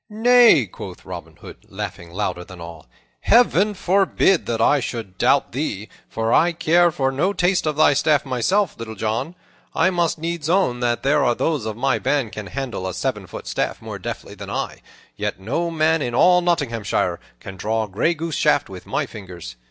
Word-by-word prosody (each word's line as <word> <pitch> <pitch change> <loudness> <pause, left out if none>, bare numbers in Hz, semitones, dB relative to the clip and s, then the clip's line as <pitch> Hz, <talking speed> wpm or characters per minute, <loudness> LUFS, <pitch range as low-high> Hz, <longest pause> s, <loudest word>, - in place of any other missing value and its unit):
"Nay," 225 - +5
quoth 95 - -10
Robin - - -8
Hood, - - -12
laughing 85 - -6
louder 90 -1 -3
than 90 0 -12
all. 85 -2 -10 0.3
"Heaven 210 -3 +3
forbid 190 -1 +2
that 115 -1 -1
I 145 +5 +4
should 110 -7 -6
doubt 140 - +3
thee, 115 -6 -4 0.2
for 115 +1 -1
I 170 +1 +4
care 170 +1 +3
for 135 -4 -1
no 170 +9 0
taste 180 -3 +1
of 150 - 0
thy 150 -1 +5
staff 150 +1 +2
myself, 155 - 0
Little 110 -1 -6
John. 110 - -2 0.4
I 185 +3 +3
must 170 -3 0
needs 165 -1 -3
own 170 -10 +2
that 120 -1 -1
there 145 +1 +3
are 120 -2 +2
those 145 -7 -1
of 110 -1 -5
my 135 +2 +1
band 135 -7 0
can 110 -2 -7
handle 120 -6 -4
a 95 - -5
seven - - -3
foot - - -9
staff - - -2
more - - -7
deftly - - -6
than - - -9
I; - - -4 0.4
yet - - -3
no 140 - -2
man 160 0 +1
in 120 -3 -2
all 180 +6 +5
Nottinghamshire 115 - 0 0.2
can 95 - -9
draw 110 +4 -1
gray 110 - 0
goose 165 +1 -4
shaft - - +2
with - - -10
my - - -1
fingers. 90 - -10
140 Hz, 190 wpm, -21 LUFS, 110-170 Hz, 0.4 s, Nay